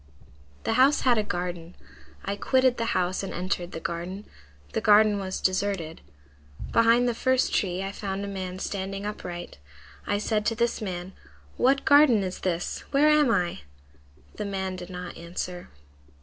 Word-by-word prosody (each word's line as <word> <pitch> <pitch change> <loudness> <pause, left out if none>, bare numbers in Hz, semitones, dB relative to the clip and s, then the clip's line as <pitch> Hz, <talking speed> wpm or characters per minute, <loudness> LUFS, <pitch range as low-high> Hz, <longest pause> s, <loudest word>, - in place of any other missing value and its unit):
"The - - 0
house 280 +3 +5
had 245 -4 +3
a - - +1
garden. 175 -3 -4 0.5
I 200 - -1
quitted 260 +3 +2
the 230 - -1
house 180 0 0
and 195 - -5
entered 180 -1 -3
the - - -5
garden. 175 +5 -5 0.5
The - - 0
garden 210 -1 +5
was 190 -1 -4
deserted. 185 -4 -1 0.7
Behind 230 +2 +4
the 240 - +1
first 260 +2 +1
tree 185 -1 0
I 195 - -3
found 200 -1 -4
a - - -5
man 185 -2 -5
standing 195 +1 -4
upright. 175 - -6 0.5
I 205 - +1
said 210 0 0
to 225 - +1
this 235 0 0
man, 185 -2 -5 0.4
'What 270 +2 +2
garden 285 -8 +6
is 185 -1 -4
this? 175 -2 -2
Where 290 +2 +4
am 300 -3 +5
I?' 180 -6 +1 0.8
The 210 - -3
man 190 -2 -3
did 180 0 -8
not 180 -1 -7
answer. 175 +1 -6
195 Hz, 165 wpm, -26 LUFS, 180-230 Hz, 0.8 s, garden